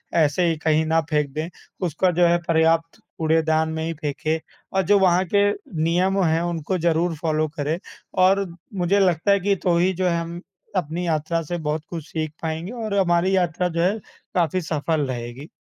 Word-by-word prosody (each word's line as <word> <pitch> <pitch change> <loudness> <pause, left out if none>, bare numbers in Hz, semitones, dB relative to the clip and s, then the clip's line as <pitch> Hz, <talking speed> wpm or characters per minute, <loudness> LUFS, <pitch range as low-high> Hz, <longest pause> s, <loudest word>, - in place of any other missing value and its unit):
ऐसे 160 +2 +3
ही 160 - -1
कहीं 155 0 +2
ना 160 +1 +3
फेंक 150 -2 +1
दें। 155 +3 -3 0.4
उसका 180 +4 +1
जो 175 +1 +3
है 170 0 +4
पर्याप्त 165 0 +2 0.2
कूड़ेदान 160 0 +2
में 160 0 -3
ही 165 - -2
फेंकें 155 +1 -2 0.3
और 190 - +3
जो 200 +3 +4
वहाँ 185 -1 +4
के 200 0 +5 0.3
नियम 185 +3 +2
हैं, 160 0 +2
उनको 175 +1 -2
ज़रूर 170 0 +1
फॉलो 155 -1 +1
करें 150 +3 -1 0.5
और 195 +1 +3 0.4
मुझे 200 +3 +3
लगता 180 +1 +2
है 200 - +4
कि 200 +1 +1
तो 175 -2 +3
ही 185 +2 +2
जो 185 +1 0
है 170 -1 +1
हम 170 +1 -6 0.4
अपनी 175 +2 -2
यात्रा 160 +1 0
से 175 +3 -3
बहुत 155 -1 -2
कुछ 165 -3 -6
सीख 155 -1 -3
पाएँगे 160 +5 -3
और 210 -2 -2
हमारी 180 +1 +2
यात्रा 180 0 0
जो 170 0 -1
है 200 +5 +2 0.4
काफ़ी 180 +1 +1
सफल 155 -1 -1
रहेगी। 125 +3 -6
165 Hz, 190 wpm, -23 LUFS, 155-180 Hz, 0.5 s, के